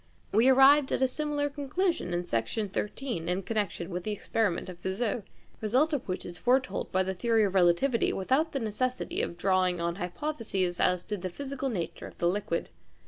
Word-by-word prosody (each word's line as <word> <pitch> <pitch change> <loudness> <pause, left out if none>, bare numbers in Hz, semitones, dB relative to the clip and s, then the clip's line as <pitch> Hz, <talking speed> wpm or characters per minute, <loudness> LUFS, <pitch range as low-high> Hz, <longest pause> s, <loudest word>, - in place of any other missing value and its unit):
We 225 +5 +5
arrived 270 +2 +6
at - - +1
a - - +5
similar 295 +2 -1
conclusion 290 - -1
in 175 0 -1
Section 170 - -1
13 210 -3 -3
in 185 +2 -1
connection 195 -4 -2
with 175 0 -3
the 215 - -3
experiment 205 -3 -1
of 180 -2 -9
Fizeau, 195 +5 -1
the 200 - -23
result 260 +9 +2
of 280 - -2
which 185 - -3
is 175 0 -5
foretold 255 +1 +1
by 190 0 +2
the 190 +1 -2
theory 225 +4 +2
of 195 -2 0
relativity 190 +7 +3
without 265 - +1
the 275 - -2
necessity 250 +3 -2
of 170 - -3
drawing 185 -1 +2
on 170 +1 -1
hypotheses 195 - -2
as 180 -1 +2
to 210 - -3
the 185 0 -4
physical 275 +6 -4
nature 180 -8 -4
of - - -14
the 170 - +1
liquid. 175 -2 -1
210 Hz, 195 wpm, -29 LUFS, 180-265 Hz, -, arrived